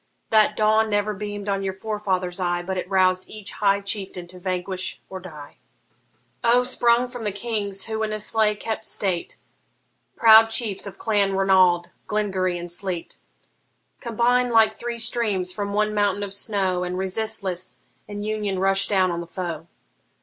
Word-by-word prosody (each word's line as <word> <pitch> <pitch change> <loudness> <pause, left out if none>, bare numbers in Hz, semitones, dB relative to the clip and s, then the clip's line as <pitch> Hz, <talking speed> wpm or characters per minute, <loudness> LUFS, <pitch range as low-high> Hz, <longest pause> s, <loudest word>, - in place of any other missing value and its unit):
That 215 -1 +4
dawn 215 +1 +3
never 205 0 0
beam'd 205 0 -6
on 195 -1 0
your 190 -1 -3
forefathers' 190 -3 -2
eye, 175 -1 -1
But 190 +1 -3
it 180 - -6
roused 185 -1 +2
each 210 -2 -6
high 200 -1 +1
chieftain 195 -3 -4
to 180 0 -11
vanquish 185 0 -3
or 190 - -5
die. 155 -6 -11 0.9
O, 240 +1 +4
sprung 240 -1 +3
from 245 -1 -9
the 210 -2 -1
Kings 200 -2 0
who 220 0 -3
in 215 -1 -1
Islay 215 0 +1
kept 220 +1 -4
state, 185 -4 -2 0.8
Proud 225 0 +7
chiefs 220 -3 +1
of 195 - -9
Clan 200 -3 +1
Ranald, 185 -3 +3 0.2
Glengarry, 190 -4 -1
and 175 0 -7
Sleat! 175 -1 -2 0.8
Combine 245 +1 +1
like 225 -2 +4
three 240 0 -5
streams 220 -6 0
from 200 0 -3
one 210 +1 +1
mountain 205 -1 +1
of 200 -1 -5
snow, 195 -3 0
And 180 0 -3
resistless 190 -1 -2 0.3
in 205 0 -6
union 210 -2 -2
rush 195 +1 +2
down 190 -3 +2
on 170 0 -3
the 170 - -8
foe! 170 -2 -5
200 Hz, 160 wpm, -23 LUFS, 185-215 Hz, 0.9 s, Proud